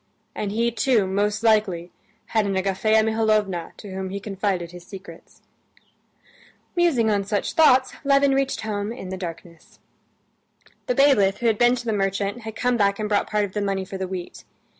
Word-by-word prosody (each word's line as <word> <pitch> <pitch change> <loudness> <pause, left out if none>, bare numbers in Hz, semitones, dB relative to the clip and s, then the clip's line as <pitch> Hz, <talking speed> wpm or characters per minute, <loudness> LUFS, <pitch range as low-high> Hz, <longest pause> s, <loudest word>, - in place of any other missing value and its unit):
And 205 - -3
he 230 +3 +1
too, 235 -2 +2
most 205 +3 -1
likely, 205 -6 +2 0.3
had 215 -2 0
an 195 - -1
Agafea 200 +3 +2
Mihalovna 215 -5 0
to 200 -2 -9
whom 190 0 -4
he 200 +1 -4
confided 195 -4 -2
his 175 -1 -11
secrets." 195 +2 -13 1.3
Musing 290 -11 +2
on 200 -1 +1
such 205 +1 -2
thoughts 265 -6 +4
Levin 275 0 +4
reached 270 0 0
home 210 -1 -3
in 210 -6 -7
the 190 - -4
darkness. 170 -2 -9 1.1
The 250 - 0
bailiff, 230 -9 +4
who 240 - -5
had 225 -2 +2
been 240 +1 +5
to 240 -1 -7
the 225 - 0
merchant, 200 +2 -1
had 220 0 -7
come 245 +1 +1
back 200 -2 +2
and 215 - -2
brought 205 -1 0
part 210 -1 +1
of 190 - -10
the 210 - -2
money 195 -1 -1
for 195 0 -7
the 190 - -2
wheat. 180 -1 -7
210 Hz, 180 wpm, -23 LUFS, 195-230 Hz, 1.3 s, been